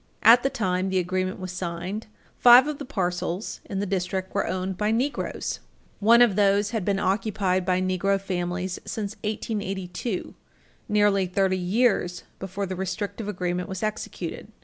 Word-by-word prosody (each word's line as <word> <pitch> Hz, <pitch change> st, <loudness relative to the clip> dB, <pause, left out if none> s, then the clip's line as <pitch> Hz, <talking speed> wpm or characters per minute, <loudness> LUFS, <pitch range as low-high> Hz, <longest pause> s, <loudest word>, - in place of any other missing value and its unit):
At 235 Hz, +3 st, +8 dB
the 270 Hz, -, +1 dB
time 185 Hz, -5 st, -1 dB
the 190 Hz, -, 0 dB
agreement 185 Hz, +1 st, -1 dB
was 185 Hz, -1 st, -5 dB
signed, 180 Hz, +4 st, -4 dB, 0.3 s
five 245 Hz, +2 st, +9 dB
of 300 Hz, -1 st, -4 dB
the 285 Hz, -, -5 dB
parcels 180 Hz, -4 st, -2 dB
in 200 Hz, -, -5 dB
the 200 Hz, -, 0 dB
district 185 Hz, 0 st, -2 dB
were -, -, 0 dB
owned 185 Hz, 0 st, -2 dB
by 210 Hz, +3 st, 0 dB
Negroes. 250 Hz, +6 st, -1 dB, 0.4 s
One 235 Hz, +3 st, +7 dB
of 220 Hz, -6 st, +3 dB
those 205 Hz, 0 st, +3 dB
had 225 Hz, -5 st, -1 dB
been 200 Hz, +1 st, +1 dB
occupied 195 Hz, -1 st, 0 dB
by 185 Hz, -1 st, +2 dB
Negro 185 Hz, +1 st, +1 dB
families 180 Hz, -1 st, -3 dB
since 210 Hz, -2 st, -4 dB
1882, 200 Hz, -2 st, -3 dB, 0.6 s
nearly 205 Hz, -2 st, +3 dB
thirty 190 Hz, +1 st, +1 dB
years 180 Hz, -2 st, +1 dB, 0.2 s
before 195 Hz, +1 st, -4 dB
the 185 Hz, 0 st, -4 dB
restrictive 195 Hz, +3 st, -4 dB
agreement 180 Hz, -2 st, -2 dB
was 190 Hz, 0 st, -5 dB
executed. 215 Hz, 0 st, -4 dB
195 Hz, 155 wpm, -25 LUFS, 185-210 Hz, 0.6 s, five